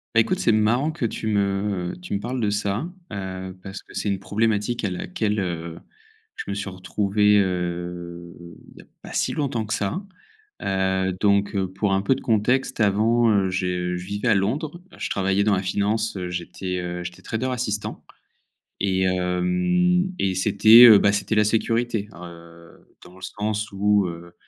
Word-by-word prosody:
Bah, -, -, +6 dB
écoute, 180 Hz, +12 st, +2 dB
c'est 115 Hz, -, +3 dB
marrant 115 Hz, +8 st, +2 dB
que 155 Hz, -6 st, -3 dB
tu 110 Hz, -, -6 dB
me 100 Hz, -3 st, -1 dB
tu 180 Hz, -, -7 dB
me 100 Hz, -, 0 dB
parles 125 Hz, +4 st, -4 dB
de 105 Hz, -3 st, 0 dB
ça, 100 Hz, +7 st, -1 dB, 0.2 s
heu, 95 Hz, -2 st, -6 dB
parce 95 Hz, 0 st, -7 dB
que -, -, -17 dB
c'est 105 Hz, -, -1 dB
une 100 Hz, -1 st, -1 dB
problématique 110 Hz, +3 st, -1 dB
à 100 Hz, -, -1 dB
laquelle, 105 Hz, +4 st, -2 dB
heu, 85 Hz, -2 st, -4 dB, 0.6 s
je -, -, -5 dB
me -, -, -1 dB
suis 100 Hz, 0 st, -4 dB
retrouvé, 100 Hz, +3 st, +1 dB
heu, 85 Hz, -2 st, -3 dB, 0.4 s
il -, -, -21 dB
y -, -, -11 dB
a -, -, -24 dB, 0.2 s
pas -, -, -10 dB
si -, -, 0 dB
longtemps 135 Hz, -7 st, -2 dB
que 110 Hz, -, -3 dB
ça. 105 Hz, -, -2 dB, 0.6 s
Heu, 95 Hz, -1 st, 0 dB
donc 100 Hz, 0 st, +2 dB
heu, 95 Hz, -1 st, 0 dB
pour 95 Hz, +2 st, -1 dB
un 95 Hz, -, +1 dB
peu 135 Hz, -, +3 dB
de 130 Hz, -, -6 dB
contexte 120 Hz, +5 st, +1 dB
avant, 110 Hz, +3 st, +3 dB
heu, 100 Hz, -2 st, +2 dB
j'ai 90 Hz, -1 st, -2 dB
je 90 Hz, -, -6 dB
vivais 100 Hz, +5 st, -3 dB
à 110 Hz, -, +5 dB
Londres. 145 Hz, -, -2 dB
Je -, -, -4 dB
travaillais 95 Hz, +1 st, +1 dB
dans 105 Hz, -1 st, +3 dB
la 95 Hz, -, -2 dB
finance, 105 Hz, +4 st, 0 dB
heu, 90 Hz, -2 st, -4 dB
j'étais, 90 Hz, +1 st, -4 dB
heu, 90 Hz, 0 st, -4 dB
j'étais 90 Hz, 0 st, -9 dB
trader 120 Hz, +3 st, -2 dB
assistant, 105 Hz, -5 st, -3 dB, 0.8 s
et 95 Hz, -1 st, +1 dB
hem, 90 Hz, -, +1 dB
et 95 Hz, -1 st, 0 dB
c'était, 110 Hz, +5 st, +7 dB
heu, 110 Hz, -3 st, +9 dB
bah, 100 Hz, +1 st, +3 dB
c'était 105 Hz, +1 st, -1 dB
la 105 Hz, -, +5 dB
sécurité. 115 Hz, 0 st, 0 dB
Heu, 85 Hz, -1 st, -13 dB, 0.2 s
dans 90 Hz, -, -15 dB
le 95 Hz, -, -16 dB
sens 105 Hz, +2 st, -3 dB
où, 100 Hz, 0 st, +2 dB
heu, 85 Hz, +1 st, -9 dB
100 Hz, 185 wpm, -23 LUFS, 90-110 Hz, 0.8 s, heu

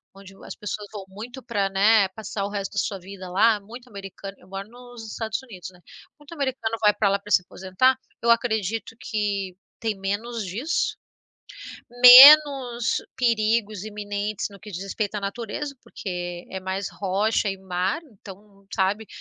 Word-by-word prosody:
onde 195 Hz, 0 st, -14 dB
o -, -, -17 dB
as -, -, -8 dB
pessoas 210 Hz, 0 st, -6 dB
vão 205 Hz, -3 st, -8 dB
muito 230 Hz, +7 st, -9 dB
para, 200 Hz, -4 st, -1 dB
né, 200 Hz, +1 st, +4 dB
passar 200 Hz, 0 st, -5 dB
o -, -, -4 dB
resto 200 Hz, -1 st, -5 dB
da 200 Hz, -, -1 dB
sua 195 Hz, 0 st, -2 dB
vida 185 Hz, 0 st, -10 dB
lá, 210 Hz, +3 st, +3 dB
muito 240 Hz, +5 st, -12 dB
americano 195 Hz, -1 st, -9 dB
eu 180 Hz, -, -20 dB
moro 195 Hz, +1 st, -7 dB
nos 245 Hz, 0 st, -12 dB
Estados 220 Hz, -1 st, -3 dB
Unidos, 190 Hz, -8 st, -10 dB
né. 180 Hz, -, -20 dB, 0.4 s
Muito 295 Hz, +3 st, -13 dB
americano 260 Hz, -6 st, -2 dB
vai 210 Hz, -1 st, +5 dB
para 205 Hz, -2 st, +2 dB
lá 200 Hz, 0 st, +1 dB
para 205 Hz, +1 st, -12 dB
se -, -, +5 dB
aposentar. 190 Hz, +8 st, +1 dB, 0.3 s
Eu 235 Hz, 0 st, +3 dB
acredito 225 Hz, -1 st, -1 dB
que 200 Hz, -4 st, -3 dB, 0.2 s
tem 220 Hz, -3 st, -2 dB
menos 215 Hz, +4 st, -3 dB
disso, 245 Hz, -, -2 dB, 1.1 s
menos 260 Hz, -2 st, +8 dB, 0.2 s
perigos 220 Hz, -4 st, +1 dB
iminentes 205 Hz, -1 st, -4 dB
no 200 Hz, -, -14 dB
que 210 Hz, -, -12 dB
diz 185 Hz, +2 st, -6 dB
respeito 205 Hz, +1 st, -3 dB
à 205 Hz, -, -1 dB
natureza, 235 Hz, +7 st, -5 dB
porque 175 Hz, -2 st, -6 dB
é 190 Hz, -, -4 dB
mais 190 Hz, +1 st, -4 dB
rocha 205 Hz, +2 st, 0 dB
e 195 Hz, -, -4 dB
mar, 190 Hz, -, -2 dB
então 200 Hz, -, -15 dB
sabe 200 Hz, +3 st, 0 dB
205 Hz, 170 wpm, -24 LUFS, 195-230 Hz, 1.1 s, menos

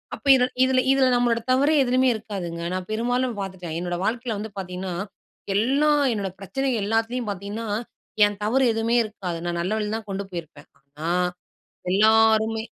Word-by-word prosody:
அப்ப -, -, -11 dB
இத 255 Hz, -, +3 dB, 0.2 s
இதுல 260 Hz, 0 st, +3 dB
இதுல 270 Hz, -1 st, +3 dB
நம்மளோட 240 Hz, -1 st, +2 dB
தவறே 285 Hz, +4 st, +3 dB
எதுலயுமே 255 Hz, +1 st, +3 dB
இருக்காதுங்க. 190 Hz, -6 st, -5 dB
நான் 185 Hz, -1 st, -4 dB
பெரும்பாலும் 245 Hz, +1 st, 0 dB
பார்த்துட்டேன். 185 Hz, -4 st, -6 dB
என்னோட 175 Hz, 0 st, -3 dB
வாழ்க்கையில 230 Hz, -1 st, -2 dB
வந்து 215 Hz, +1 st, -6 dB
பாத்தீங்கன்னா, 180 Hz, 0 st, -5 dB, 0.6 s
எல்லா 275 Hz, +8 st, +3 dB, 0.2 s
என்னோட 200 Hz, -3 st, -3 dB
பிரச்சனை 270 Hz, +8 st, -2 dB
எல்லாத்துலேயும் 225 Hz, +2 st, -1 dB
பாத்தீங்கன்னா, 200 Hz, +4 st, -5 dB, 0.6 s
என் 205 Hz, -1 st, -3 dB
தவறு 260 Hz, +5 st, +2 dB
எதுவுமே 225 Hz, +2 st, +1 dB
இருக்காது. 195 Hz, -5 st, -5 dB
நான் 170 Hz, 0 st, -2 dB
நல்ல 185 Hz, +5 st, -1 dB
வழிலதான் 215 Hz, 0 st, -3 dB
கொண்டு 195 Hz, +1 st, -3 dB
போயிருப்பேன். 160 Hz, -5 st, -8 dB
ஆனா, 145 Hz, +4 st, -7 dB, 0.8 s
எல்லாருமே 220 Hz, +2 st, +4 dB
220 Hz, 145 wpm, -24 LUFS, 190-245 Hz, 0.8 s, எல்லாருமே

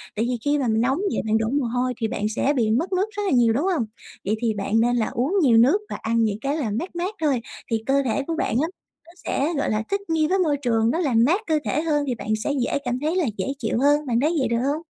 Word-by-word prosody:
Tại 220 Hz, +2 st, 0 dB
vì 245 Hz, 0 st, -1 dB
khi 290 Hz, +1 st, +2 dB
mà 260 Hz, -, 0 dB
mình 220 Hz, 0 st, +2 dB
nóng 265 Hz, +3 st, +1 dB, 0.2 s
vậy -, -, 0 dB
bạn 220 Hz, 0 st, +2 dB
đổ 220 Hz, -, 0 dB
mồ 280 Hz, 0 st, 0 dB
hôi 250 Hz, +2 st, -1 dB
thì 225 Hz, -, -1 dB
bạn 210 Hz, -1 st, -2 dB
sẽ 285 Hz, -, +2 dB
bị 220 Hz, -3 st, +2 dB
mất 325 Hz, -, 0 dB
nước 375 Hz, +2 st, +2 dB
rất 410 Hz, 0 st, -4 dB
là 390 Hz, -, 0 dB
nhiều, 240 Hz, -3 st, +4 dB
đúng 280 Hz, +9 st, 0 dB
hông? 245 Hz, -9 st, 0 dB, 0.4 s
Vậy 210 Hz, +3 st, +1 dB
thì 230 Hz, -2 st, +1 dB
bạn 205 Hz, +2 st, 0 dB
nên 240 Hz, +2 st, +2 dB
là 230 Hz, -3 st, +1 dB
uống 260 Hz, -, -1 dB
nhiều 245 Hz, -7 st, +5 dB
nước 255 Hz, -, +5 dB
và -, -, -4 dB
ăn 230 Hz, 0 st, +1 dB
những 210 Hz, -2 st, 0 dB
cái 280 Hz, +3 st, -1 dB
là 240 Hz, -9 st, -2 dB
mát 340 Hz, -, -4 dB
mát 365 Hz, +5 st, -3 dB
thôi 275 Hz, -6 st, +1 dB, 0.3 s
thì 225 Hz, -1 st, 0 dB
cơ 275 Hz, +1 st, +2 dB
thể 260 Hz, +3 st, 0 dB
của 330 Hz, -, -1 dB
bạn 335 Hz, -, -1 dB
á, 320 Hz, -, +1 dB, 0.4 s
nó 335 Hz, -, -15 dB
sẽ, 300 Hz, +5 st, 0 dB
gọi 280 Hz, -, 0 dB
là, 215 Hz, +1 st, 0 dB
thích 400 Hz, 0 st, 0 dB
nghi 315 Hz, -1 st, +2 dB
với 385 Hz, +4 st, +1 dB
môi 305 Hz, -6 st, +2 dB
trường, 230 Hz, -4 st, +1 dB
nó 330 Hz, -, -1 dB
làm 245 Hz, -9 st, +3 dB
mát 350 Hz, -, +2 dB
cơ 310 Hz, -1 st, +2 dB
thể 300 Hz, -, 0 dB
hơn 300 Hz, -3 st, +1 dB
thì 250 Hz, -, -1 dB
bạn 220 Hz, -, -8 dB
sẽ -, -, 0 dB
dễ -, -, 0 dB
cảm 245 Hz, +1 st, -1 dB
thấy 310 Hz, +4 st, -1 dB
là 365 Hz, -3 st, +2 dB
dễ 190 Hz, -, -2 dB
chịu 225 Hz, -1 st, -1 dB
hơn, 290 Hz, +2 st, +3 dB
bạn 235 Hz, -2 st, +1 dB
thấy 320 Hz, +4 st, +1 dB
vậy 265 Hz, -, +1 dB
được 235 Hz, 0 st, 0 dB
hông? 310 Hz, -, -4 dB
260 Hz, 295 wpm, -23 LUFS, 230-310 Hz, 0.4 s, nhiều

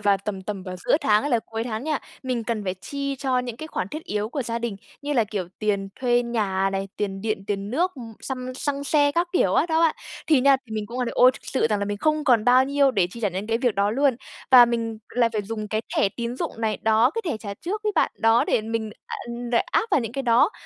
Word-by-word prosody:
vào 205 Hz, -1 st, +3 dB
tầm 195 Hz, -3 st, -4 dB
tầm 195 Hz, -1 st, -5 dB
vào 185 Hz, -1 st, -6 dB
giữa 180 Hz, -, +2 dB
tháng 210 Hz, -8 st, +3 dB
hay 290 Hz, -, -2 dB
là 240 Hz, -, +4 dB
cuối 225 Hz, 0 st, -4 dB
tháng 225 Hz, 0 st, -4 dB
nha, 305 Hz, -2 st, 0 dB, 0.2 s
mình 250 Hz, -3 st, -2 dB
cần 220 Hz, -2 st, -2 dB
phải 185 Hz, -1 st, -1 dB
chi 275 Hz, +8 st, -4 dB
cho 260 Hz, -1 st, 0 dB
những 245 Hz, -2 st, -4 dB
cái 315 Hz, -, -7 dB
khoản 185 Hz, -, -3 dB
thiết 310 Hz, +8 st, -7 dB
yếu 210 Hz, 0 st, -2 dB
của 275 Hz, +3 st, -3 dB
gia 230 Hz, -1 st, -2 dB
đình 235 Hz, -3 st, -3 dB, 0.3 s
như 290 Hz, +1 st, -2 dB
là, 240 Hz, -5 st, +3 dB
kiểu, 200 Hz, -4 st, -4 dB
tiền 200 Hz, -2 st, 0 dB
thuê 245 Hz, -1 st, +3 dB
nhà 205 Hz, -5 st, 0 dB
này, 195 Hz, 0 st, -2 dB
tiền 195 Hz, -2 st, -3 dB
điện, 215 Hz, -2 st, -2 dB
tiền 200 Hz, 0 st, -3 dB
nước, 350 Hz, +9 st, 0 dB
ưm, 235 Hz, -5 st, -9 dB
xăm 255 Hz, -1 st, -5 dB
xăng 280 Hz, +1 st, -2 dB
xe 290 Hz, -1 st, +3 dB
các 340 Hz, +3 st, +1 dB
kiểu 360 Hz, -, +2 dB
á -, -, +3 dB
đó 320 Hz, -1 st, +1 dB
bạn. 330 Hz, -2 st, +4 dB, 0.3 s
Thì 300 Hz, -5 st, +4 dB
nha 275 Hz, +1 st, +6 dB
thì 220 Hz, -, -7 dB
mình 215 Hz, -1 st, -3 dB
cũng, 235 Hz, +4 st, -6 dB
ơ, 250 Hz, -, +1 dB
đ -, -, -2 dB
ôi 250 Hz, +1 st, +6 dB
thực -, -, -11 dB
sự 265 Hz, -, 0 dB
rằng 210 Hz, -, +2 dB
là 200 Hz, -, -1 dB
mình 205 Hz, 0 st, -3 dB
không 305 Hz, +4 st, +1 dB
còn 235 Hz, -6 st, +4 dB
bao 250 Hz, +2 st, +6 dB
nhiêu 280 Hz, 0 st, +3 dB
để 195 Hz, -8 st, +2 dB
chi 235 Hz, -, -9 dB
trả 210 Hz, -, +1 dB
những 190 Hz, +2 st, -4 dB
cái 225 Hz, +1 st, 0 dB
việc 245 Hz, -3 st, +1 dB
đó 200 Hz, +1 st, +2 dB
luôn, 270 Hz, +2 st, +2 dB, 0.3 s
và 250 Hz, -2 st, +10 dB
mình 230 Hz, -2 st, -2 dB, 0.2 s
lại 240 Hz, -1 st, +4 dB
phải 215 Hz, -2 st, -1 dB
dùng 215 Hz, +1 st, -5 dB
cái 215 Hz, +1 st, 0 dB, 0.2 s
thẻ -, -, +4 dB
tín 235 Hz, +1 st, -3 dB
dụng -, -, -3 dB
này, 220 Hz, -1 st, 0 dB
đó, 220 Hz, +3 st, +4 dB
cái 455 Hz, -, -2 dB
thẻ -, -, -1 dB
trả 205 Hz, -2 st, -7 dB
trước 400 Hz, -, -4 dB
ấy 425 Hz, -1 st, 0 dB
bạn, 320 Hz, -, +3 dB
đó, 225 Hz, +1 st, +4 dB
để -, -, +2 dB
mình, 220 Hz, 0 st, -3 dB, 0.2 s
a -, -, -5 dB, 0.3 s
đ -, -, 0 dB, 0.2 s
áp 450 Hz, -, +1 dB
vào 300 Hz, -, +4 dB
những 230 Hz, -2 st, -4 dB
cái 275 Hz, +1 st, -3 dB
đó. 240 Hz, -, +4 dB
235 Hz, 280 wpm, -24 LUFS, 210-270 Hz, 0.3 s, và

